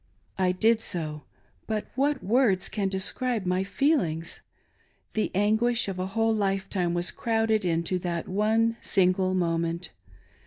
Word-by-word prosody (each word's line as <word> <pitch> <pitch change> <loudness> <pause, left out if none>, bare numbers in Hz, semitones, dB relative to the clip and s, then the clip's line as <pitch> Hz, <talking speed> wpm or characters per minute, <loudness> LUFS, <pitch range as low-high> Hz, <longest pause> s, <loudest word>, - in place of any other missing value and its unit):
I 185 -1 +3
did 220 +5 +3
so; 155 -7 -3 0.4
but 215 -1 -2
what 280 +2 0
words 210 -3 +2
can 200 -1 -1
describe 205 +4 -1
my 180 +1 +1
feelings! 195 - 0 0.7
The 215 - 0
anguish 220 +4 +2
of 190 -2 -4
a 185 - -2
whole 225 0 +3
lifetime 195 -4 -1
was 175 0 +1
crowded 225 -2 0
into 170 +1 0
that 170 -2 -3
one 220 +4 +1
single 185 -1 +2
moment. 170 -1 -1
195 Hz, 130 wpm, -27 LUFS, 180-225 Hz, 0.7 s, I